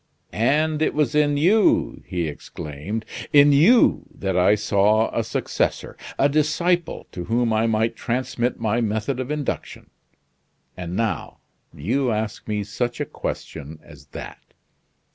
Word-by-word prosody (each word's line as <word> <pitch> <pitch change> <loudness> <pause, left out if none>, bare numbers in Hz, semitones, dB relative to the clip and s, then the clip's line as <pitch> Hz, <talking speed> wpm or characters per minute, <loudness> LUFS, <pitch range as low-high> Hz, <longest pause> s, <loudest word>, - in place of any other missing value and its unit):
"And 150 +7 +1
it - - +1
was 150 -5 +1
in 145 -1 +3
you," 195 +9 +3
he 85 -3 -2
exclaimed, 75 +7 -6 0.3
"in 145 0 +7
you 195 - +5
that 95 -8 -2
I 90 +3 +5
saw 105 +2 +2
a - - +1
successor, - - -2 0.2
a 140 - +4
disciple 165 +4 0
to 90 -1 -6
whom 115 0 +1
I 110 +1 +2
might 115 +1 +1
transmit 125 0 -2
my 115 +1 0
method 110 +4 -1
of 130 +1 -4
induction; 150 -2 -4 0.8
and 90 -1 -5
now, 115 0 -2 0.3
you 125 - -1
ask 110 -1 -3
me 105 -1 -1
such 120 +4 -3
a - - -1
question 75 +3 -6
as - - -15
that! - - -9
115 Hz, 140 wpm, -23 LUFS, 105-145 Hz, 0.8 s, in